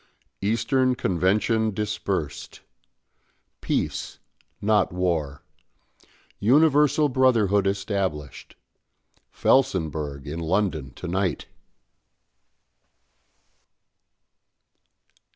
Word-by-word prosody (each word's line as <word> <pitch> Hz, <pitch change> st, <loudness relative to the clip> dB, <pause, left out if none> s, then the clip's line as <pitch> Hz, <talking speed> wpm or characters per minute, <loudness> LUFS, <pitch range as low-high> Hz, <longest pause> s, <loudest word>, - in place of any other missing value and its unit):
"EASTERN 125 Hz, +5 st, +1 dB
CONVENTION 105 Hz, +3 st, +1 dB
DISPERSED. 105 Hz, -6 st, -4 dB, 1.0 s
PEACE, -, -, -2 dB, 0.4 s
NOT 105 Hz, 0 st, +2 dB
WAR. 80 Hz, -6 st, -2 dB, 1.0 s
UNIVERSAL 150 Hz, +4 st, +4 dB
BROTHERHOOD 115 Hz, -7 st, +3 dB
ESTABLISHED. 95 Hz, -, -3 dB, 0.7 s
FELSENBURGH 80 Hz, -, 0 dB
IN 75 Hz, +3 st, -5 dB
LONDON 85 Hz, -4 st, -1 dB
TO 90 Hz, -, -7 dB
NIGHT." 90 Hz, -4 st, -1 dB
100 Hz, 55 wpm, -24 LUFS, 85-115 Hz, 1.0 s, UNIVERSAL